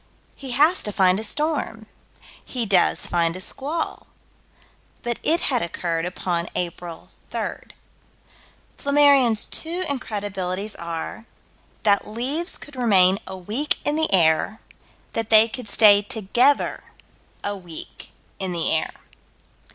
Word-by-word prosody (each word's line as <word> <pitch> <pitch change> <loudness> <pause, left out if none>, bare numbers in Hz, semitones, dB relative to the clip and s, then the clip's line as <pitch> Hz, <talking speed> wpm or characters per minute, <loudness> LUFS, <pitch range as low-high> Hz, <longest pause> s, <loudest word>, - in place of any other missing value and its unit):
He 270 - -9
has 305 +8 +4
to 210 - -2
find 190 -2 +3
a - - -4
storm. 285 -3 -2 0.6
He 245 -3 -3
does 190 -4 +3
find 170 -1 0
a - - -6
squall 290 - -4 1.0
but 240 -1 -2
it 335 +3 +1
had 250 -4 +2
occurred 170 0 -2
upon 175 -1 -2
April 175 -1 -5 0.2
3rd. - - -5 1.1
Flammarion's 280 -6 +4
two 345 +3 -3
incredibilities 205 -6 -3
are 170 +6 -5 0.6
that 200 -2 +3
leaves 265 - -2
could 290 - -12
remain 195 -6 +4
a 190 - -6
week 215 +11 -2
in 295 - +1
the 315 0 +2
air: 170 +4 +3 0.5
that 225 -1 -3
they 220 0 +7
could 235 -1 -7
stay 205 -2 +6
together 230 +7 +1 0.6
a 205 - -2
week 175 -4 -10 0.3
in 190 -2 -2
the 170 -2 +1
air. 160 - 0
215 Hz, 125 wpm, -23 LUFS, 185-270 Hz, 1.1 s, they